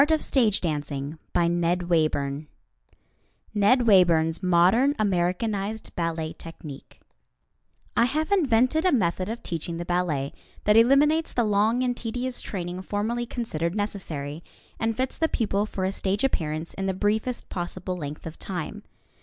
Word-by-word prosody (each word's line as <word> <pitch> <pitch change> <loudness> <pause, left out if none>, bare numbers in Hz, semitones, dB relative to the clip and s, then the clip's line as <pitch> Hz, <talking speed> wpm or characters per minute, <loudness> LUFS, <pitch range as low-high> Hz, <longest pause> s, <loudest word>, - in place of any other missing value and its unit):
[Illustration: 165 - +1 0.2
LINA 175 0 +2
BASQUETTE] 155 -3 0 1.1
NED 220 +5 +4
WAYBURN'S 170 -5 +4
MODERN 190 +10 +4
AMERICANIZED 200 +2 -1
BALLET 165 -2 -2
TECHNIQUE 155 -4 -10 1.0
I 235 - +5
have 310 +8 -1
invented 295 - +3
a 370 - +4
method 185 -5 +1
of 230 +1 -5
teaching 165 0 -4
the 175 - -4
ballet 170 -6 -1 0.3
that 210 - +4
eliminates 285 +7 +4
the 240 - +2
long 215 +4 +2
and 245 -1 0
tedious 245 +2 -3
training 180 -2 -4
formerly 220 +5 -2
considered 170 -8 -2
necessary, 165 -8 -3 0.4
and 225 0 0
fits 260 0 -2
the 320 - +2
pupil 210 -2 0
for 190 - -4
a 190 - +1
stage 195 +2 -1
appearance 160 - -1
in 195 0 -3
the 190 - -1
briefest 215 +5 -1
possible 180 +1 -4
length 150 -3 -6
of 165 0 -8
time. 175 -5 -5
195 Hz, 135 wpm, -26 LUFS, 170-235 Hz, 1.1 s, I